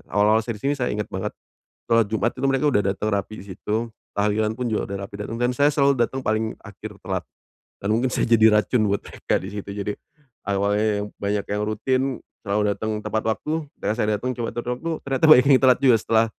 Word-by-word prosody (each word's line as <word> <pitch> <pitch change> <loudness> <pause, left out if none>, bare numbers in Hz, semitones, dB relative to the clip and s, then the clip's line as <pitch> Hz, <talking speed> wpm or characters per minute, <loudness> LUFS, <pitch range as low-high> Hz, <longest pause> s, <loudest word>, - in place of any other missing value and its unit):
awal-awal 105 +2 +3
saya 115 -2 -4
di 105 - -16
sini 145 - +2
saya 125 -3 -1
inget 105 0 -3
banget - - -3 0.6
sholat 115 -2 +4
Jumat 115 +2 +1
itu - - 0
mereka 135 +1 +1
udah 105 - +2
datang 105 - -2
rapi 100 +2 -2
di - - -14
situ. 110 +5 -3 0.2
Tahlilan 105 +1 +1
pun 125 +1 -3
juga 110 - -1
udah - - -2
rapi 100 - -10
datang 115 - -5
dan 120 0 +2
saya 145 +2 +4
selalu 140 -1 +3
datang 125 +3 0
paling 110 0 0
akhir 105 0 -9
telat, 95 -2 -3 0.6
dan 100 - -4
mungkin 120 +3 +1
saya - - +1
jadi 110 -1 +6
racun 120 -1 +1
buat 100 - +1
mereka - - -2
di - - -7
situ 100 -1 -6
jadi, 100 0 -3 0.5
awalnya 100 +2 +1 0.2
yang - - -3 0.2
banyak 100 0 -1
yang 105 +1 -1
rutin 115 +5 0 0.4
selalu 100 +1 +1
datang 110 0 -3
tepat 110 - -1
waktu, 150 +7 -2 0.3
ketika - - 0
saya 105 - +1
datang 125 +4 -2
coba 115 -1 -3
tepat 120 0 -4
waktu 165 +6 -4 0.2
ternyata 135 +2 +2
banyak 130 -3 +8
yang - - +4
telat 130 -1 +6
juga 130 -4 +6
setelah 115 0 +3
110 Hz, 220 wpm, -23 LUFS, 105-125 Hz, 0.6 s, banyak